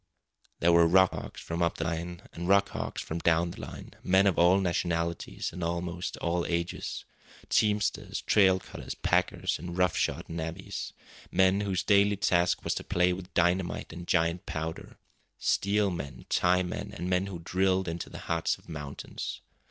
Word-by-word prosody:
There 85 - +5
were 85 0 +6
rock 95 +2 +5
hogs - - -7
from 85 +1 -4
up 85 - +1
the - - -2
line, 85 +1 -4
and 85 +1 -5
rock 100 +1 +4
hogs - - -4
from 80 - -4
down 85 +1 +2
the - - -9
line, - - -8
men 95 +2 +4
of 95 -3 +2
all 90 +3 +6
nationalities 85 -2 -1
and 90 - -7
of 85 - 0
almost 85 +1 -3
all 85 0 0
ages; 85 0 -3 0.4
teamsters, 105 -1 +1
trail 95 -3 +5
cutters, - - -8
packers, - - 0
and 85 +2 -6
rough 90 -2 +3
shod - - -1
navvies; 80 +3 -5 0.4
men 95 +2 +3
whose 95 -2 -1
daily 100 0 +4
task 90 -3 +2
was - - 0
to - - -4
play 90 0 +2
with 90 0 -8
dynamite 90 0 +1
and 85 +1 -8
giant 85 0 +1
powder; 80 +1 -5 0.4
steel 100 0 +1
men, 70 -8 -6
tie 90 +1 +3
men, 90 - -5
and 90 - -4
men 90 +1 +1
who 95 -3 -5
drilled 95 +2 +1
into 85 0 -4
the - - -9
hearts 80 0 0
of - - -23
mountains. 75 -4 -6
90 Hz, 175 wpm, -29 LUFS, 85-95 Hz, 0.4 s, were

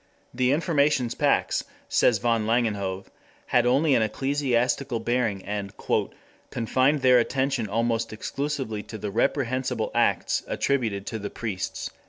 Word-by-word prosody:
The 125 +1 +2
Informations 145 -5 +2
Pax, - - +1 0.2
says 115 - +3
M. - - -15
van 115 -2 +1
Langenhove, 100 -5 0 0.4
had 120 0 +2
only 140 +4 +3
an 120 - +4
ecclesiastical 130 +1 0
bearing 115 -4 -1
and 100 -1 -4 0.7
"confined 130 +4 +1
their 125 -1 +6
attention 130 -1 0
almost 115 +1 0
exclusively 130 -1 -3
to 110 - -9
the 105 -1 -4
reprehensible 130 -2 0
acts - - +1
attributed 110 -8 -1
to 110 - -4
the 100 - -5
priests." 100 -5 -4
120 Hz, 130 wpm, -25 LUFS, 110-135 Hz, 0.7 s, their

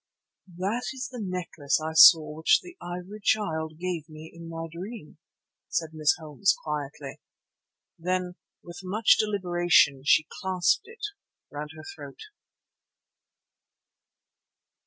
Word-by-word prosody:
"That 205 +7 -2
is 260 -1 -5
the 245 -3 -6
necklace 180 -7 -2
I 160 +1 -4
saw 160 -1 +8
which 160 - +4
the 355 -1 -12
Ivory 180 +4 -7
Child 160 -7 0
gave 170 -3 -4
me 155 +1 -11
in 170 0 -10
my 165 0 -5
dream," 175 0 -9 0.5
said 160 -2 -1
Miss 155 -1 +2
Holmes 160 +4 +1
quietly. 145 -2 -5 0.8
Then 180 +1 -1 0.3
with 175 -1 -10
much 205 +4 +3
deliberation 175 -9 +3
she 155 +2 +4 0.2
clasped 190 - +1
it 455 -1 -7 0.5
round 150 +1 -6
her 155 - -11
throat. 145 -3 -11
170 Hz, 115 wpm, -27 LUFS, 155-190 Hz, 0.8 s, saw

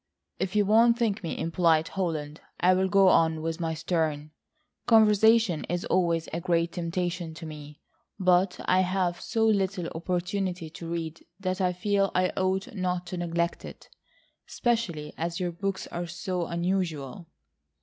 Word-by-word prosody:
"If 190 +2 -2
you 205 -1 +4
won't 230 +3 +5
think 220 -3 0
me 170 - -4
impolite, 165 -1 +2
Holland, 155 -5 -3 0.2
I'll 185 +2 +3
go 195 -1 +5
on 160 -2 +3
with 165 +1 -3
my 165 -1 -2
Sterne. 155 -2 -1 0.6
Conversation 220 -4 +5
is 175 +1 -2
always 170 -3 +1
a 170 - -2
great 170 -1 +1
temptation 175 -1 -3
to 165 - -8
me, 150 -1 -10 0.4
but 180 0 +3
I 185 - +3
have 185 -1 0
so 225 -1 0
little 195 -4 +1
opportunity 180 0 -2
to 165 +1 -8
read 165 -1 -4 0.2
that 185 0 -2
I 180 -1 +2
feel 195 +2 +1
I 185 0 +3
ought 190 +5 -1
not 180 -2 -2
to - - -2
neglect 170 0 -1
it,—especially 210 -11 -5
as 170 +1 -2
your 180 -1 -1
books 195 +2 -3
are 175 0 -4
so 175 +1 -3
unusual." 170 -3 -2
180 Hz, 150 wpm, -27 LUFS, 165-195 Hz, 0.6 s, won't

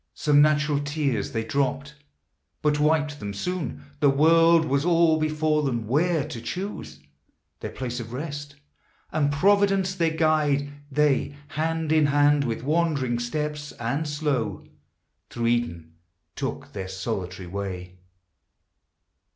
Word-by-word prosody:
Some 145 -1 +4
natural 150 -1 +3
tears 145 -7 -1
they 115 -1 -2
dropt, 140 +1 -1 0.7
but 150 -1 +2
wiped 150 -1 +1
them 100 -1 -5
soon; 100 - -4 0.2
The 145 - +4
world 165 +3 +5
was 140 -1 +1
all 165 -2 +4
before 155 0 +1
them, 120 -6 -1
where 155 +5 +1
to 115 - -6
choose 185 - -6 0.6
Their - - -5
place 125 -1 -5
of 115 -1 -7
rest, 145 +1 -6 0.6
and 145 -2 +1
Providence 195 +4 +3
their 170 -3 +1
guide. 155 -3 +1 0.2
They, 145 0 +1
hand 160 0 -1
in 155 -2 +4
hand, 145 0 +3
with 115 -1 -3
wandering 145 -5 +1
steps 150 +4 -3
and 135 +7 -2
slow, 145 -9 -2 0.6
Through 120 -1 -3
Eden 85 -9 -1 0.4
took - - -5
their 95 -2 -5
solitary 95 -2 -4
way. 90 -1 -6
145 Hz, 125 wpm, -25 LUFS, 120-155 Hz, 0.7 s, world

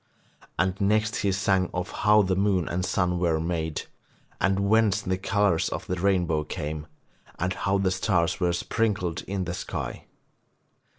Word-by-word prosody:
And 95 +1 0
next 110 +2 +2
he 100 - +1
sang 95 -1 +1
of 90 0 -3
how 105 0 +4
the 95 -1 +1
moon 95 -3 +1
and 90 +1 -2
sun 90 -2 0
were 85 -3 +1
made, 80 -1 -2 0.6
and 95 0 +2
whence 110 -2 +3
the 95 - -1
colours 95 -2 +1
of - - -5
the - - -3
rainbow 90 -4 +1
came, 75 0 -5 0.5
and 90 +2 -1
how 100 0 0
the 95 -1 +1
stars 95 -3 +1
were 90 -2 +2
sprinkled 100 -3 -1
in 95 -1 -2
the 85 0 -3
sky. - - -5
95 Hz, 160 wpm, -26 LUFS, 85-100 Hz, 0.6 s, how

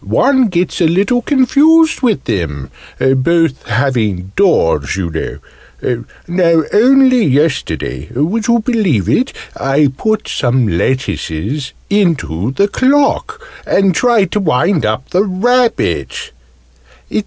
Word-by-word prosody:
"One 265 -3 +2
gets 180 -1 -2
a 165 - +4
little 200 +9 +1
confused 305 +5 +3
with 220 - 0
them 80 - -4 0.3
both 135 +3 +1
having 110 -7 -1
doors, 85 - +1
you 90 -3 -3
know. 115 +8 -6 0.2
Now, 170 -2 +2
only 255 +2 +4
yesterday 130 - -1
would 190 - -1
you 235 0 +3
believe 200 - 0
it? 245 - +1 0.2
I 135 0 +1
put 215 +6 -2
some 120 -2 0
lettuces 130 - -3
into 160 - 0
the 200 +7 +1
clock, 290 - 0 0.2
and 195 -1 +2
tried 220 -4 +2
to 210 - 0
wind 165 - +1
up 110 +5 -4
the 185 +3 +2
rabbit!" 225 - -1
170 Hz, 115 wpm, -14 LUFS, -, 0.3 s, a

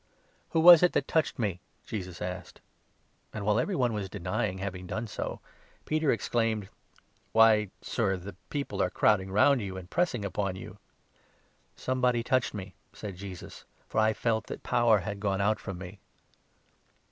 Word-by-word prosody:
" - - -37
Who 165 - +3
was 170 -1 +10
it 180 - +4
that 140 - 0
touched 160 -3 +1
me? 100 -7 -1
" - - -39
Jesus 90 -4 -5
asked; 90 0 -6 0.7
and, 110 - -5
45 - - -5
while 105 +2 +3
every 195 +9 0
one 125 -6 +1
was 100 -3 -3
denying 95 0 -2
having 95 -1 -5
done 110 +5 -3
so, 110 - -5 0.4
Peter 155 -2 +1
ex 115 - -2
claimed: 110 -4 0 0.3
" - - -39
Why, 110 -2 +5
Sir, 95 -5 0
the 95 +3 -8 0.2
people 145 -1 -2
are - - +2
crowding 95 -2 +2
round 120 +6 +4
you 95 -2 -5
and 90 -1 -10
pressing 150 - 0
upon 100 -1 -2
you! 95 - -10 0.3
" - - -36
" - - -39
Somebody 125 -2 +1
touched 130 -1 +1
me," 95 -1 -7 0.2
said 100 -3 -7
Jesus; 95 -1 -9
" - - -36
for - - 0
I 110 0 +4
felt 110 0 -1
that - - -7
power 120 -1 +3
46 - - -10
had 100 0 -4
gone 100 -2 0
out 105 +2 +2
from 95 -4 -6
me." 95 +2 -9
105 Hz, 195 wpm, -29 LUFS, 95-120 Hz, 0.7 s, was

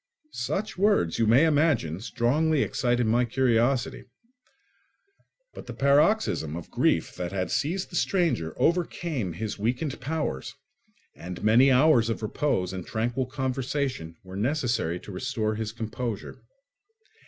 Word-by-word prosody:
Such 210 -1 -3
words, 195 - +2
you 115 - +3
may 125 +8 +6
imagine, 145 - +2
strongly 135 +7 +1
excited 120 -2 0
my 115 +3 +3
curiosity; 120 0 +1 1.5
but - - -10
the - - -7
paroxysm 140 - +2
of 85 - -8
grief - - +1
that 90 -1 -4
had 95 -1 -2
seized 165 +8 -1
the - - -7
stranger 165 - 0
overcame 165 - 0
his 105 +4 -5
weakened 125 +6 -2
powers, 150 - -3 0.6
and 90 +2 -8
many 115 +6 +5
hours 130 -3 +4
of 115 - -3
repose 105 -5 -1
and 95 -2 -5
tranquil 120 +3 -1
conversation 130 - -3
were 95 0 -10
necessary 115 - -1
to 105 - -11
restore 110 +1 -2
his 110 0 -4
composure. 115 +1 -5
120 Hz, 130 wpm, -26 LUFS, 105-145 Hz, 1.5 s, may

